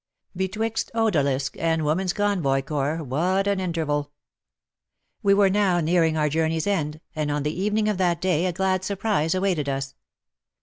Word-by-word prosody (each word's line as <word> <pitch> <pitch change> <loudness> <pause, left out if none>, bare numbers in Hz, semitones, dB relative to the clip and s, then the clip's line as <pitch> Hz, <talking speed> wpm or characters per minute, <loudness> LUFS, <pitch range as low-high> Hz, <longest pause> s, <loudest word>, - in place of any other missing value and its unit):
Betwixt 210 +5 -2
Odalisque 140 - 0
and 160 -1 +1
Women's 175 +5 +1
Convoy 175 -10 0
Corps 150 +3 -2
what 175 +9 0
an 200 -1 +1
interval! 155 -5 -2 1.1
We 200 -2 +4
were 200 -1 +5
now 190 -3 +2
nearing 165 -1 +2
our 150 -1 +2
journey's 160 +1 0
end, 155 -7 -1 0.2
and 155 -1 -1
on 145 -1 -1
the 150 +1 -1
evening 210 +3 0
of 210 -3 0
that 175 -2 +1
day 180 -1 +1
a - - 0
glad 190 +1 0
surprise 190 -5 0
awaited 185 -7 0
us. 135 0 -3
170 Hz, 160 wpm, -24 LUFS, 150-195 Hz, 1.1 s, were